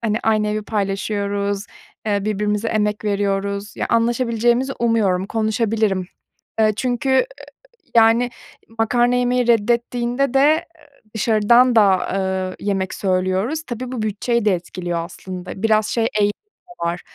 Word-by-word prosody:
hani, 220 0 0
aynı 215 -1 +2
evi 210 0 -2
paylaşıyoruz, 200 0 -2 0.4
eee, 205 -1 0
birbirimize 210 +1 -1
emek 210 -1 -1
veriyoruz. 200 0 -2
Ya, - - -2
anlaşabileceğimizi 235 +2 +1
umuyorum. 205 -6 +1
Konuşabilirim. 220 -3 0 0.5
Iıı, 215 -1 +4
çünkü, 250 +3 -1
ııı, 265 -1 +4 0.7
yani, 230 +2 +5 0.5
makarna 240 +2 +2
yemeyi 250 0 +1
reddettiğinde 240 +3 +1
de, 270 - +4
eee, 310 +4 +3 0.5
dışarıdan 235 +3 +4
da, 195 -4 +4
ııı, 190 -1 -2
yemek 190 -2 -2
söylüyoruz. 190 +10 -1
Tabii, 245 +1 -5
bu 245 - -3
bütçeyi 215 +2 -1
de 205 - +4
etkiliyor 175 -1 -4
aslında. 185 +1 -8
Biraz 215 -1 +3
şey 230 - 0 0.2
eğilimi 205 0 +2 0.4
de 260 - -6
var: 170 +1 -2
215 Hz, 130 wpm, -20 LUFS, 200-235 Hz, 0.7 s, yani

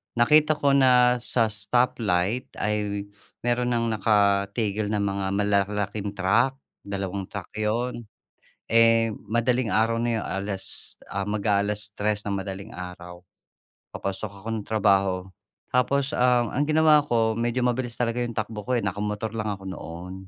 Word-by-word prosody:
nakita 150 +6 +5
ko 145 -1 +2
na 125 -2 +5
sa 115 -2 0
stoplight 105 0 0
ay 105 -1 -1 0.4
meron 120 +1 +1
nang 115 -1 0
nakatigil 100 0 +1
na 105 -1 0
mga 100 -1 -1
malalaking 100 0 0
truck. 110 +8 +2 0.3
Dalawang 100 -1 -3
truck 100 -4 -8
'yon. 115 +2 -2 0.7
Eh, 115 0 +5 0.2
madaling 120 +2 +1
araw 115 +2 +2
na 120 -1 0
'yon. 110 - -3
Alas, 95 +1 -4 0.2
ah, 100 0 -2
mag-a-alas 105 0 0
tres 105 0 -1
nang 100 -1 -2
madaling 100 +2 -7
araw. 90 -1 -8 0.8
Papasok 100 +2 -4
ako - - -9
ng 105 - -9
trabaho. 95 -4 +2 0.5
Tapos 135 +2 +2
ang 125 -2 +3
ang 145 +3 +2
ginawa 155 -1 +5
ko, 115 -4 +2
medyo 120 +2 -1
mabilis 125 -1 -1
talaga 120 0 0
'yong 120 -1 -5
takbo 110 0 -3
ko, 130 - -1
eh. - - -5
Naka-motor 105 +2 -3
lang 110 -1 -2
ako 95 - -13
noon. 90 0 -7
105 Hz, 140 wpm, -25 LUFS, 100-120 Hz, 0.8 s, nakita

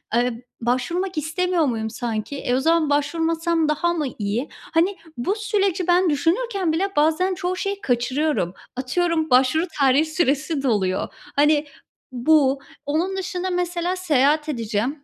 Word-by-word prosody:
Eee, 240 0 0 0.2
başvurmak 335 +10 -1
istemiyor 330 +2 0
muyum 220 -3 -1
sanki? 230 +3 -4
E, 250 -2 -1
o - - +2
zaman 320 0 +2
başvurmazsam 325 +2 +1
daha 345 +3 +1
mı 310 -4 -1
iyi?" 215 +7 -2
Hani, 355 +4 -1 0.2
bu 370 +12 0
süreci 400 -4 0
ben 355 0 +4
düşünürken 355 - 0
bile 385 +5 0
bazen 320 +5 +2
çoğu 360 +1 -2
şeyi 400 +2 -3
kaçırıyorum. 250 - 0 0.2
Atıyorum, 320 +5 0
başvuru 260 +7 +4
tarihi 275 +3 +4
süresi 305 -2 0
doluyor. 200 -7 +1 0.3
Hani, 295 +1 +3 0.5
bu. 275 +1 +3 0.3
Onun 340 +7 -1
dışında 370 -1 -3
mesela 355 0 -1
seyahat 305 -3 +2
edeceğim, 235 +3 -2
310 Hz, 135 wpm, -22 LUFS, 260-355 Hz, 0.5 s, ben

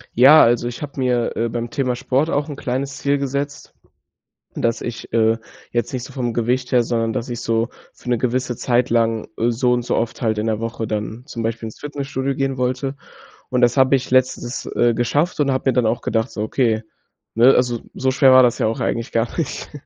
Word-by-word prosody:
Ja. 135 +6 +8
Also, 120 +1 +2
ich 120 - -6
habe 145 -1 -6
mir, 125 -2 0
äh, 115 +1 0
beim 120 +1 -4
Thema 130 -2 -1
Sport 135 +5 0
auch 145 -1 -1
‘n 145 - -5
kleines 135 0 -3
Ziel 140 0 +1
gesetzt, 140 +1 -4 0.8
dass 115 -1 -1
ich, 120 -1 -7
äh, 110 0 +3 0.3
jetzt 120 -2 -1
nicht 125 -2 -3
so - - -11
vom 125 -3 -2
Gewicht 125 +2 -1
her, 125 -1 +5
sondern 115 -1 -1
dass 115 +3 -3
ich 120 -1 -4
so 115 0 0 0.2
für - - -13
‘ne 120 - +2
gewisse 125 0 -1
Zeit 125 +1 +1
lang, 115 -1 +1
äh, 115 +1 +1
so 125 +1 +1
und 120 0 +1
so 120 - -1
oft 115 0 -2
halt 110 -2 +1
in 105 - -1
der 110 -1 -1
Woche 115 0 -3
dann 110 +2 -4
zum 120 -6 -5
Beispiel 115 0 -3
ins 110 - -9
Fitnessstudio 140 -2 -3
gehen 135 0 -1
wollte 130 +2 -1 0.5
und 125 - 0
das 120 +1 +4
habe 130 0 +4
ich 130 - -5
letztens, 130 -1 0
äh, 120 -1 +3
geschafft 145 +9 0
und 140 -2 +2
habe 130 0 0
mir - - -1
dann 125 -3 +2
auch 110 +2 0
gedacht, 115 +2 -1
so: 105 - -4
„Okay. 110 0 +1 0.5
Ne, 120 +4 +6
also 120 -2 +1
so 130 - 0
schwer 130 0 +5
war 130 0 +8
das 120 -2 +2
ja - - +1
auch 110 - -2
eigentlich 115 +1 -2
gar 115 +1 +1
nicht." 165 - -3
125 Hz, 225 wpm, -20 LUFS, 115-130 Hz, 0.8 s, Ja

